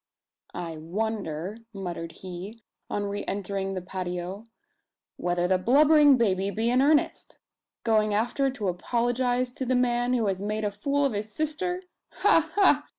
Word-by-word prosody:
"I 165 -2 -5
wonder," 195 +1 -3 0.2
muttered 170 -3 -5
he, 190 +5 -8 0.3
on 205 - -1
re 200 0 -3
entering 195 -1 -2
the 185 - -4
patio, 180 +2 -5 0.7
"whether 175 0 0
the 185 0 +2
blubbering 290 +5 +6
baby 195 -4 +1
be 225 +3 0
in 250 +1 +4
earnest? 295 +2 +1 0.5
Going 215 -2 +3
after 240 +6 +1
to 245 -7 -4
apologise 245 +6 0
to 260 - -5
the 255 0 +1
man 245 0 +2
who 235 -3 +1
has 195 -1 -1
made 215 +1 -2
a 205 - 0
fool 280 +7 0
of 270 - 0
his 210 +1 -4
sister! 340 - -2 0.4
Ha 330 -6 +5
ha! 295 -8 +4
215 Hz, 150 wpm, -27 LUFS, 190-255 Hz, 0.7 s, blubbering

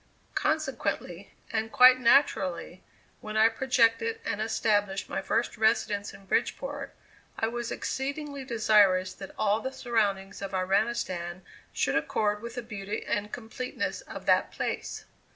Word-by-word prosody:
Consequently, 210 - -2 0.2
and 220 0 -1
quite 255 -1 +8
naturally, 195 -9 +2 0.4
when 215 0 -5
I 220 +1 +6
projected 230 -2 +2
and 210 - -2
established 205 -3 0
my - - -3
first 235 +1 -1
residence 215 -2 +1
in 195 - -14
Bridgeport, - - -2 0.4
I 225 - 0
was 240 0 -4
exceedingly 280 +1 -3
desirous 210 -6 +3
that 195 - -9
all 210 0 +2
the 260 +4 -4
surroundings 200 -7 -1
of 195 -1 -4
Iranistan 185 -2 -1 0.3
should - - 0
accord 210 -1 0
with 235 0 -7
the 245 - -4
beauty 210 -2 -5
and 210 0 -2
completeness 250 - -4
of - - -8
that - - +3
place. - - -4
220 Hz, 135 wpm, -28 LUFS, 200-240 Hz, 0.4 s, quite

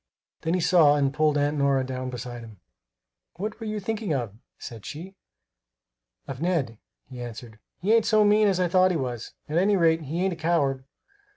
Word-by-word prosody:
Then 165 +2 0
he - - 0
saw 160 -4 +5
and 140 -2 +1
pulled 150 0 +2
Aunt 145 +1 0
Nora 140 -1 +2
down 130 0 -4
beside 120 -1 -7
him. 110 -4 -13 0.8
"What 210 +5 -5
were 225 - -6
you 215 0 -3
thinking 210 -5 -2
of?" 120 -6 -3 0.2
said 115 -3 -9
she. 175 +6 -8 1.1
"Of 135 +1 -7
Ned," 155 -11 -1 0.3
he 125 -2 -9
answered. 115 -2 -9 0.2
"He 200 +6 +1
ain't 230 -1 +3
so 215 -1 +4
mean 210 +1 +4
as 190 -2 +1
I 180 - +2
thought 185 +1 +4
he 180 - 0
was. 125 -5 -5
At 155 +3 +1
any 200 +2 +3
rate, 165 -2 +3
he 160 +5 -3
ain't 190 - 0
a - - -9
coward." 140 -6 0
155 Hz, 195 wpm, -25 LUFS, 130-185 Hz, 1.1 s, saw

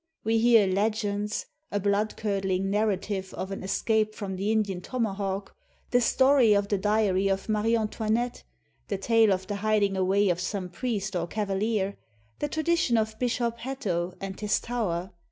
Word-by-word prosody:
We 225 +1 +2
hear 230 -2 +6
legends 205 +1 -1
— 310 +1 -45
a 205 - 0
bloodcurdling 200 -2 0
narrative 195 -1 -1
of 190 - -5
an 195 - -5
es 190 - -1
cape 215 -1 +1
from 195 -2 -4
the 200 +3 -1
Indian 205 -5 0
tomahawk, 200 -4 -3 0.4
the 245 - +4
story 260 -2 +5
of 200 0 +1
the 205 - +1
diary 200 -2 +2
of 195 0 -1
Marie 215 +1 +2
Antoinette, 225 +2 -1 0.4
the 200 - -2
tale 225 +1 +4
of 190 0 0
the 205 +1 -3
hiding 205 -1 +1
away 190 +2 +2
of 175 -1 +1
some 185 0 -3
priest 200 -3 -3
or 170 -1 -1
oavaHer, 200 0 -1 0.4
the 295 - 0
tradition 315 -4 +1
of 220 0 -1
Bishop 235 -1 -1
Hatto 185 -9 -3
and 195 -1 -6
his 210 -1 +1
tower. 190 -7 -2
205 Hz, 165 wpm, -27 LUFS, 195-225 Hz, 0.4 s, hear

